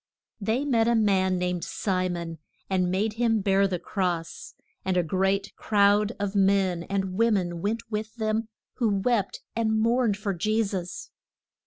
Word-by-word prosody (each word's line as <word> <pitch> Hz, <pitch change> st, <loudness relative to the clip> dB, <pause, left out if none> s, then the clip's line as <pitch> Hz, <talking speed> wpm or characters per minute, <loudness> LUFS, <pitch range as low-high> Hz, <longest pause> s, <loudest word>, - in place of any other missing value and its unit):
They 225 Hz, +7 st, 0 dB
met 230 Hz, -5 st, +2 dB
a 235 Hz, -, +3 dB
man 190 Hz, -4 st, +2 dB
named 180 Hz, -1 st, -1 dB
Si 185 Hz, -2 st, -1 dB
mon, 170 Hz, -2 st, -5 dB, 0.3 s
and 185 Hz, -1 st, +2 dB
made 205 Hz, +4 st, 0 dB
him 225 Hz, -1 st, +1 dB
bear 195 Hz, 0 st, +3 dB
the 185 Hz, -2 st, -2 dB
cross. 175 Hz, -2 st, -3 dB, 0.3 s
And 190 Hz, -1 st, 0 dB
a 180 Hz, -, +3 dB
great 195 Hz, +4 st, 0 dB
crowd 205 Hz, +1 st, +3 dB
of 200 Hz, -1 st, -2 dB
men 195 Hz, -3 st, +2 dB
and 195 Hz, -1 st, -1 dB
wo 230 Hz, +3 st, +3 dB
men 175 Hz, -5 st, -1 dB
went 225 Hz, +4 st, -1 dB
with 215 Hz, +1 st, -3 dB
them 220 Hz, -1 st, -1 dB, 0.3 s
who 235 Hz, -4 st, +2 dB
wept 205 Hz, -1 st, 0 dB
and 220 Hz, -1 st, +1 dB
mourned 230 Hz, -2 st, +2 dB
for 205 Hz, -1 st, -2 dB
Je 215 Hz, +6 st, +1 dB
sus. 185 Hz, -4 st, -5 dB
200 Hz, 165 wpm, -26 LUFS, 185-220 Hz, 0.3 s, a